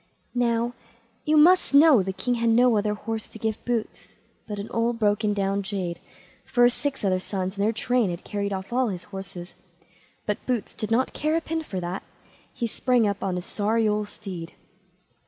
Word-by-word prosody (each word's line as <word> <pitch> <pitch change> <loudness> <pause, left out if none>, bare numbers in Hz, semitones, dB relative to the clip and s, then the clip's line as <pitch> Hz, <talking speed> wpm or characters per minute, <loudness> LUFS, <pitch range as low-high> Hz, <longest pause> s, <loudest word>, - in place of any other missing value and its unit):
Now, 240 -1 +1 0.5
you 305 0 +3
must 340 -1 +5
know 290 -6 +8
the 190 +1 -2
king 245 +6 -1
had 235 -1 +1
no 240 +1 +5
other 210 0 +1
horse 225 +1 -4
to - - -11
give 220 0 -3
Boots 235 -3 -3 0.3
but 210 -1 -4
an 200 +1 -5
old 230 +1 0
broken 210 -1 +2
down 195 0 0
jade, 190 -4 -3 0.4
for 245 - +2
his 240 0 +6
six 280 -6 -3
other 185 -1 +2
sons 190 0 -3
and 200 - -1
their 215 - +3
train 230 -1 +1
had 175 0 -5
carried 200 -1 -3
off 190 +3 -4
all 255 0 +2
his 185 -4 -4
horses; 190 -3 -8 0.7
but 210 - -2
Boots 245 -5 -1
did 215 - -4
not 240 +3 +1
care 305 +1 0
a 330 - +1
pin 325 0 -2
for 205 -12 -5
that, 175 +2 -3 0.5
he 235 - -3
sprang 240 0 +2
up 200 -1 -2
on 190 -2 -1
his 180 0 -4
sorry 220 +2 +1
old 210 0 0
steed. 175 -5 -8
215 Hz, 195 wpm, -25 LUFS, 195-245 Hz, 0.7 s, know